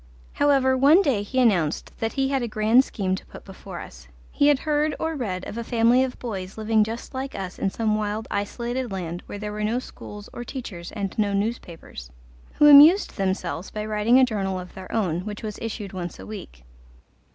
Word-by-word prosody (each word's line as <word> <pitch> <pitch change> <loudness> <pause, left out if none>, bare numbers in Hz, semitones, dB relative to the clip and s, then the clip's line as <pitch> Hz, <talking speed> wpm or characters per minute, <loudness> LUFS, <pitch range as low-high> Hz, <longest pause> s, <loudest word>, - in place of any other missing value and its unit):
However, 275 -2 +3
one 290 +9 +6
day 255 - +1
he 255 +6 -2
announced 180 -11 +1
that 225 0 -2
he 270 -1 0
had 270 -1 0
a 240 - -2
grand 220 +4 +4
scheme 190 -7 -2
to 190 - -4
put - - -12
before - - -9
us. - - -11 0.2
He 285 - +3
had 290 -2 +5
heard 300 0 +1
or 320 0 -2
read 190 -9 -3
of 230 - -6
a - - -3
family 235 +2 +3
of 260 -1 -4
boys 195 -5 -6
living 220 0 +2
just 225 +5 -6
like 265 +1 -5
us 190 -1 -6
in 195 - +1
some 220 +2 -1
wild 215 +1 -2
isolated 235 +4 -3
land 175 -2 -4
where - - -6
there 210 0 -5
were 210 0 -4
no 220 +3 0
schools 210 -4 -9
or 240 - -6
teachers 210 -10 -7
and 200 -3 -4
no 205 -1 +1
newspapers, 200 - -4 0.4
who 295 - +5
amused 300 +7 +8
themselves 190 -2 -2
by 210 0 -5
writing 215 +3 +3
a 260 - +6
journal 195 -5 -2
of 180 0 -10
their 190 -1 -10
own, 185 -7 0
which 205 +4 -7
was 210 -2 -5
issued 215 -3 -5
once 175 -3 -5
a 95 - -10
week. - - -9
215 Hz, 210 wpm, -24 LUFS, 195-255 Hz, 0.4 s, amused